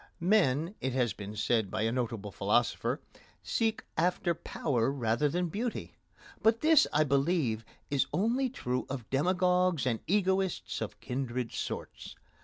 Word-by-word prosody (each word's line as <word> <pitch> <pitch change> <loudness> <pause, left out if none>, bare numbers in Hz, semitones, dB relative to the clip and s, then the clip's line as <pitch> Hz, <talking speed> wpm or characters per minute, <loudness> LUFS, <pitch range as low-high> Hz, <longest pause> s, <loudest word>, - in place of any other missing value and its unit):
Men, 170 -3 +2
it 130 -1 -1
has 125 -3 +1
been 105 +1 -8
said 110 -1 +1
by 110 +2 -1
a 115 - +1
notable 115 -4 -3
philosopher, - - +1 0.4
seek 225 -1 0
after 175 +1 +1
power 135 -6 -1
rather 130 +2 +1
than 175 +4 0
beauty; 225 +8 -4 0.5
but 225 +1 +3
this, 315 -1 +6
I 150 - +4
believe, 140 -5 +1 0.3
is 140 -2 +2
only 240 +7 +1
true 125 - -3
of 130 -5 -5
demagogues 180 +2 +2
and 115 -3 0
egoists 190 -1 0
of - - -5
kindred 125 -2 -3
sorts. - - -5
145 Hz, 140 wpm, -31 LUFS, 120-185 Hz, 0.5 s, this